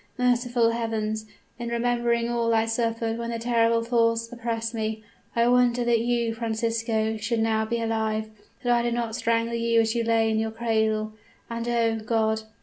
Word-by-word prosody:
Merciful 245 -2 +2
heavens! 220 -2 -2 0.3
in 235 0 -4
remembering 235 0 +1
all 235 -1 +1
I 225 0 +3
suffered 230 0 -1
when 235 0 -3
the 230 - -2
terrible 230 0 +2
thoughts 230 -1 +1
oppressed 230 -1 -3
me, 220 -1 -3 0.3
I 235 0 +3
wonder 245 0 +3
that 235 -1 +3
you, 235 -1 0
Francisco, 225 -1 -1
should 225 +2 -1
now 220 -1 +1
be 235 +1 -2
alive 220 -1 -1 0.3
that 245 -1 +3
I 240 - +3
did 235 0 -1
not 230 -2 -2
strangle 230 0 0
you 230 0 +2
as 225 -1 +2
you 235 -1 0
lay 225 -1 +2
in 220 - +1
your 220 0 0
cradle. 220 -1 0 0.4
And, 230 0 -3
oh 230 -1 +2
God! 220 0 0
230 Hz, 175 wpm, -25 LUFS, 225-235 Hz, 0.4 s, I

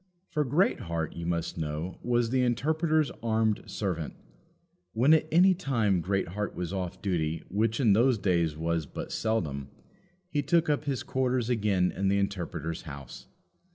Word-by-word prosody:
For 150 - +1
Greatheart, 95 - 0
you 85 0 -5
must 85 -1 -2
know, 80 +3 -4
was 120 -1 +1
the 130 -1 +2
Interpreter's 155 +5 +1
armed 110 -2 +1
servant. 90 -7 -3 0.8
When 130 +7 +5
at 155 -1 +3
any 180 +4 +6
time 115 - +1
Greatheart 95 +2 -2
was 90 +1 -4
off 95 -1 -4
duty, 80 -4 -1
which 110 +3 0
in 115 -7 +5
those 120 +3 +4
days 85 -6 +1
was 80 -1 -1
but - - -7
seldom, 75 -12 -1 0.6
he 150 -4 0
took 165 0 +2
up 150 0 -1
his 140 -3 -1
quarters 125 -2 0
again 100 -6 +2
in 95 - -1
the 100 +1 +3
Interpreter's 85 -5 -2
house. 70 -5 -9
100 Hz, 155 wpm, -29 LUFS, 85-130 Hz, 0.8 s, any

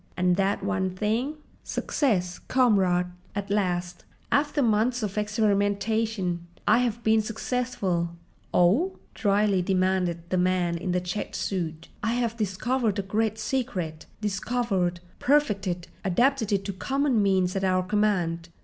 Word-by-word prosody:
"And 180 -1 +3
that 195 +1 0
one 195 -2 0
thing?" 225 +9 0 0.3
"Success, 180 - 0
comrades! 190 -8 +2 0.3
At 200 0 -3
last—after 200 - -1
months 230 +2 +2
of 200 -2 -3
experimentation—I 205 -2 0
have 235 -2 -1
been 220 0 +4
successful!" 215 -6 -1 0.4
"'Ow?" 240 - +3 0.2
dryly 200 -2 +2
demanded 180 -2 0
the 185 - +2
man 180 -1 +1
in 175 +2 -2
the 180 0 +1
checked 180 +4 -4
suit. 170 -4 -3
"I 225 +2 0
have 235 -2 0
discovered 220 +1 0
a 200 - -1
great 220 +2 0
secret—discovered, 195 -2 -2 0.2
perfected, 200 -11 +1 0.2
adapted 230 +4 +2
it 195 -1 +1
to 200 - -3
common 265 +3 +1
means 190 -2 +2
at 195 - -1
our 185 -1 +2
command. 180 -5 0
200 Hz, 120 wpm, -26 LUFS, 180-225 Hz, 0.4 s, been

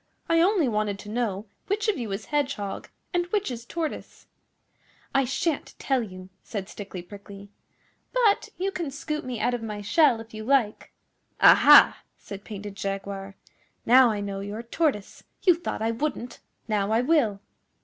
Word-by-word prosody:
I 330 0 +3
only 365 -4 +3
wanted 210 -3 -1
to 205 - -10
know 215 -3 -2 0.2
which 420 +2 -1
of 430 - +2
you 230 -5 -5
is 195 - -4
Hedgehog 275 -9 -2 0.2
and 350 0 0
which 410 -4 -1
is 235 -1 -7
Tortoise.' 325 +1 -5 0.9
'I 275 -1 +3
shan't 280 +4 -2
tell 265 -2 0
you,' 185 -4 -9
said 200 -4 -6
Stickly 195 -4 -8
Prickly, 200 +1 -12 0.6
'but 465 -5 +2
you 385 +2 -1
can 340 -6 -4
scoop 300 +2 -4
me 250 -3 -5
out 245 +3 +1
of 245 - -2
my 210 -2 -5
shell 240 +4 +3
if 225 0 -11
you 215 0 -6
like.' 240 -4 +1 0.5
'Aha!' - - +8 0.2
said 200 0 -10
Painted 205 -1 -7
Jaguar. 195 0 -5 0.5
'Now 250 +1 +7
I 210 -2 -2
know 200 -1 -4
you're 205 +3 -6
Tortoise. 235 -4 -2 0.2
You 365 - +6
thought 335 -9 -4
I 225 - +1
wouldn't! 245 -1 -4 0.3
Now 210 -2 0
I 225 +2 +3
will. 250 -8 +2
230 Hz, 165 wpm, -26 LUFS, 205-295 Hz, 0.9 s, Aha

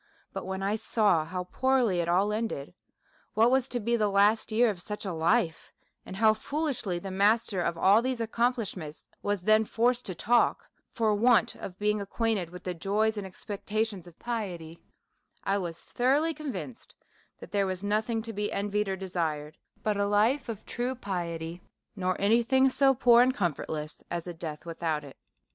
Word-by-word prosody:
But, - - -5
when 190 0 -3
I 205 +2 0
saw 210 -7 +2
how 180 +2 -4
poorly 245 -1 +1
it 170 0 0
all 195 +4 +2
ended, 215 - -3 0.6
what 225 +3 +5
was 265 0 +2
to 245 - -2
be 235 +2 +1
the 215 -3 +2
last 205 +3 +3
year 230 +1 +4
of 180 -4 -8
such 210 +3 -6
a 190 - -2
life, 165 +1 +1 0.4
and - - -7
how 215 +2 +5
foolishly 250 - -2
the 190 +2 -6
master 200 0 +2
of 170 -1 -1
all 200 +6 +5
these 255 0 -2
accomplishments 225 - -2 0.2
was 205 -3 -1
then 215 +2 +5
forced 240 +3 +1
to 185 - -3
talk, 235 +7 +2 0.2
for 220 -3 +1
want 235 +2 +4
of 180 - -8
being 210 0 0
acquainted 200 -3 -1
with 180 +1 -10
the 180 - -3
joys 210 +6 0
and 205 -2 -4
expectations 205 0 -4
of 170 - -15
piety: 180 -9 -5 0.6
i 195 - +1
was 170 -3 -5
thoroughly 285 +7 +1
convinced 195 - -7 0.4
that - - -11
there 200 -1 +1
v/as 185 0 -4
nothing 220 +2 0
to 225 0 -6
be 210 0 -2
envied 205 0 -1
or 190 - 0
de 190 0 -6
sired 155 -4 -2 0.3
but 210 -1 0
a 200 0 +1
life 225 +7 +2
of 220 -3 -6
true 250 +2 -2
piety; 175 -6 -4 0.3
nor 185 -2 -1
any 220 +4 +4
thing 265 +2 +4
so 270 0 +3
poor 240 -1 +6
and 255 +1 +3
comfortless 155 -3 -3
as 170 -1 -3
a 175 - -5
death 160 -2 -7
without 165 -2 -2
it." 140 -2 -11
205 Hz, 185 wpm, -28 LUFS, 180-230 Hz, 0.6 s, poor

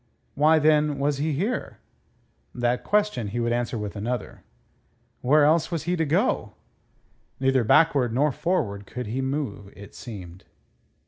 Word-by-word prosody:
Why, 155 +3 +4
then, 150 -1 +3
was 140 0 0
he 155 +1 0
here? 200 - -2 0.8
That 120 0 0
question 210 - +1
he 110 +4 -3
would 120 0 0
answer 120 0 -2
with 105 -1 -5
another: 120 +4 -4 0.8
Where 145 +3 +4
else 155 +2 +3
was 165 -3 -3
he 175 +2 0
to 165 -2 0
go? 155 - 0 0.9
Neither 135 -1 +2
backward 130 0 +4
nor 140 +5 +2
forward 120 - -2
could 125 0 -6
he 120 +5 -3
move, 130 -8 -4
it 100 0 -12
seemed. 95 -7 -10
135 Hz, 145 wpm, -25 LUFS, 115-155 Hz, 0.9 s, Why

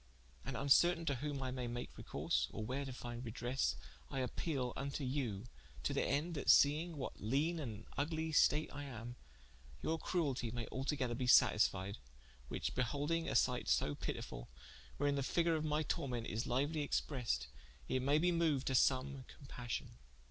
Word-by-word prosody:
And 135 - -4
vncertaine 165 +6 +4
to 140 - +1
whom 140 0 -3
I 130 - -2
may 125 -1 -3
make 120 +1 -5
recourse, - - -1
or 110 - -5
where 135 +4 -2
to 135 - -5
finde 120 -1 -6
redresse, 120 +3 -1 0.3
I 135 -2 -2
appeale 130 -1 -2
vnto 140 0 -3
you, 125 -6 -2 0.4
to - - 0
thende 150 +6 0
that 145 - -2
seing 155 +4 +6
in - - -9
what 130 - -4
leane 145 - +1
and 110 -7 -6
vglie 160 +2 -2
state 155 +1 +4
I 145 0 -5
am, 120 -2 -7 0.7
your 160 0 0
cruelty 140 -9 0
maye 115 0 -3
altogether 130 -2 -1
be 125 +1 -2
satisfied, 100 - +4 0.5
which - - -3
beholdinge 145 +7 0
a - - -2
sighte - - +2
so 75 - +3
pitifull, - - -5 0.5
wherein 145 0 +2
the - - +1
figure 165 +5 +2
of 155 -1 0
my 155 0 +1
tormente 125 -5 -2
is 110 +2 -2
liuely 145 +5 0
expressed, 120 - -1 0.4
it 130 - 0
may 140 +3 +3
be 175 +3 +3
moued 160 -6 +2
to 135 - 0
some 130 +1 +2
compassion. 120 - -6
135 Hz, 170 wpm, -37 LUFS, 120-150 Hz, 0.7 s, seing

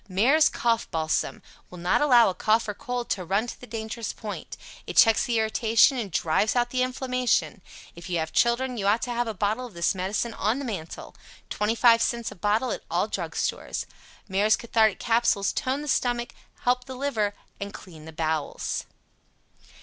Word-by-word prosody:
MARES 265 +12 +4
COUGH 230 -1 0
BALSAM 160 -1 -1 0.3
will 180 - -11
not 175 +8 +1
allow 250 -5 +6
a 190 - 0
Cold 220 +4 +2
or 210 - -2
Cough 245 +3 -4
to 185 - -1
run 195 +6 0
to 240 - -9
the 250 - -10
dangerous 220 0 -5
point. 210 -2 -7 0.3
It - - -6
checks 225 -1 +6
the 235 -2 0
irritation 225 +4 +3
and 215 -4 -3
drives 165 +8 +1
out 240 0 +1
the 255 - 0
inflammation. 255 -4 0 0.3
If 170 +2 -10
you 175 - 0
have 160 -1 -3
children 245 +1 +1
you 200 -2 -1
ought 215 +3 +2
to 245 - -3
have 240 0 -1
a 220 - -4
bottle 215 +6 -1
of 215 - -17
this 170 0 +1
medicine 200 +5 -2
on 220 +3 0
the 280 - -4
mantel. 185 -9 -6 0.4
25c 230 +2 +2
a - - -7
bottle 210 +7 0
at - - -4
all - - +1
Drug - - -4
Stores. - - -2 0.4
Mares 210 +2 +3
Cathartic 220 -3 +2
Capsules 225 -4 +1
tone 275 +1 -2
the - - -7
stomach, 245 -3 0 0.3
help 250 0 +1
the 260 -1 -8
liver 230 -7 -1 0.2
and 200 0 -5
clean 165 -7 -12
the 160 - -9
bowels. 160 -2 -2
225 Hz, 185 wpm, -26 LUFS, 200-245 Hz, 0.4 s, allow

